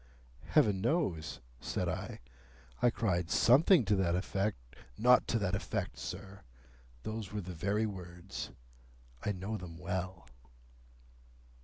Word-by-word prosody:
"Heaven 100 -3 +4
knows," 100 - 0 0.2
said - - -2
I. - - -4 0.6
"I 120 - +6
cried 90 -8 0
something 140 - +6
to 100 +2 +3
that 90 -2 +2
effect—" 100 +3 0 0.4
"Not 125 +2 +6
to 115 - +2
that 100 -4 0
effect, 60 - -2
sir. 95 +7 -6 0.6
Those 110 -3 -4
were 105 0 -2
the 90 0 -6
very 100 +6 +1
words. 90 -2 -6 0.7
I 105 - +1
know 100 +3 -3
them 85 -4 -8
well." 90 -3 -4
95 Hz, 125 wpm, -33 LUFS, 90-110 Hz, 0.7 s, I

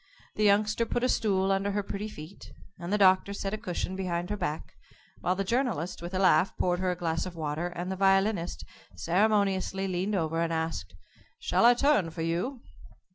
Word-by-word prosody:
The 215 - -1
Youngster 210 +2 +3
put 240 - -1
a - - +4
stool 195 -5 +1
under 195 +1 0
her 205 0 -1
pretty 200 +2 -5
feet, 155 - -11 0.3
and 175 +2 -5
the 210 - +2
Doctor 190 0 +4
set 200 0 -4
a - - -1
cushion 185 -3 -3
behind 180 -1 -3
her - - 0
back, 175 -6 -4 0.5
while 180 - 0
the 195 - -1
Journalist, 225 - -1
with 175 +2 -6
a - - +1
laugh, 185 0 +3
poured 180 -1 +1
her 185 0 0
a 180 - 0
glass 165 -1 -2
of 180 - -9
water, 160 +1 -2
and 175 +1 -5
the - - -2
Violinist 195 -2 +2 0.3
ceremoniously 195 0 +1
leaned 190 +3 -1
over, 165 -2 -1
and 165 0 0
asked, 160 0 -3 0.4
"Shall 475 - +1
I 245 +1 +7
turn 275 - +2
for 160 0 -5
you?" 185 +11 -2
190 Hz, 195 wpm, -28 LUFS, 175-205 Hz, 0.5 s, I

